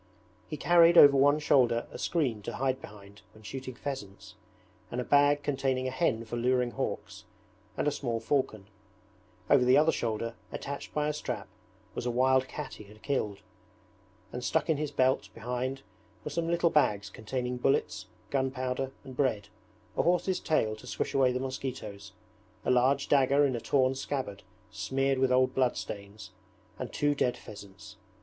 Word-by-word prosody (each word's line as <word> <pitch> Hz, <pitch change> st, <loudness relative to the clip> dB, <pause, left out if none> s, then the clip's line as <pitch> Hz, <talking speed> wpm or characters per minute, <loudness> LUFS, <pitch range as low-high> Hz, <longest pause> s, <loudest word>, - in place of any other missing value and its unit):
He 150 Hz, -, -5 dB
carried 170 Hz, +1 st, +5 dB
over 140 Hz, -3 st, +9 dB
one 145 Hz, +2 st, +5 dB
shoulder 125 Hz, -6 st, +3 dB
a -, -, -8 dB
screen 130 Hz, -11 st, 0 dB
to -, -, -6 dB
hide 130 Hz, 0 st, -1 dB
behind 100 Hz, -1 st, -13 dB
when 110 Hz, -, -16 dB
shooting 130 Hz, +3 st, -7 dB
pheasants, 120 Hz, -8 st, -7 dB, 0.6 s
and 125 Hz, -, -4 dB
a -, -, -1 dB
bag 145 Hz, +2 st, +4 dB
containing 130 Hz, -2 st, 0 dB
a -, -, -2 dB
hen 125 Hz, -5 st, 0 dB
for 115 Hz, +2 st, -5 dB
luring 125 Hz, 0 st, +1 dB
hawks, -, -, -5 dB, 0.5 s
and -, -, 0 dB
a -, -, +3 dB
small 120 Hz, -5 st, -2 dB
falcon; 115 Hz, -4 st, -1 dB, 0.8 s
over 140 Hz, -3 st, +5 dB
the 125 Hz, +2 st, +5 dB
other 155 Hz, +2 st, +5 dB
shoulder, 115 Hz, -2 st, -2 dB, 0.2 s
attached 140 Hz, 0 st, -6 dB
by 150 Hz, 0 st, +1 dB
a 150 Hz, -, 0 dB
strap, 150 Hz, -, -5 dB, 0.5 s
was 125 Hz, -, -4 dB
a -, -, +1 dB
wild 130 Hz, +2 st, +3 dB
cat 150 Hz, +1 st, -6 dB
he 105 Hz, -, -11 dB
had 105 Hz, +2 st, -17 dB
killed; 105 Hz, -8 st, -2 dB, 0.9 s
and 125 Hz, -, -5 dB
stuck 160 Hz, +5 st, +1 dB
in 155 Hz, -, +1 dB
his 150 Hz, 0 st, -2 dB
belt 130 Hz, -2 st, +1 dB
behind 125 Hz, +3 st, -3 dB, 0.4 s
were 150 Hz, -, -5 dB
some 165 Hz, +2 st, -1 dB
little 170 Hz, 0 st, +2 dB
bags 105 Hz, -9 st, +2 dB
containing 125 Hz, +3 st, -4 dB
bullets, 135 Hz, +2 st, 0 dB, 0.2 s
gunpowder, 130 Hz, -1 st, -1 dB
and 130 Hz, -, -10 dB
bread, 120 Hz, -7 st, 0 dB, 0.5 s
a -, -, +2 dB
horse's 180 Hz, +2 st, +1 dB
tail 110 Hz, -9 st, +1 dB
to -, -, -13 dB
swish -, -, -3 dB
away 135 Hz, -2 st, +4 dB
the 125 Hz, -, -2 dB
mosquitoes, 130 Hz, -7 st, -5 dB, 0.5 s
a -, -, +2 dB
large 130 Hz, +3 st, +3 dB
dagger 140 Hz, +1 st, +4 dB
in 130 Hz, -3 st, 0 dB
a 115 Hz, -, -4 dB
torn 130 Hz, +2 st, +2 dB
scabbard 130 Hz, -6 st, -4 dB, 0.3 s
smeared 135 Hz, 0 st, 0 dB
with 130 Hz, -1 st, +2 dB
old 130 Hz, 0 st, +3 dB
bloodstains, 105 Hz, -5 st, -3 dB, 0.5 s
and -, -, -5 dB
two 145 Hz, 0 st, +1 dB
dead 125 Hz, -3 st, 0 dB
pheasants. 100 Hz, 0 st, -12 dB
130 Hz, 170 wpm, -29 LUFS, 115-140 Hz, 0.9 s, over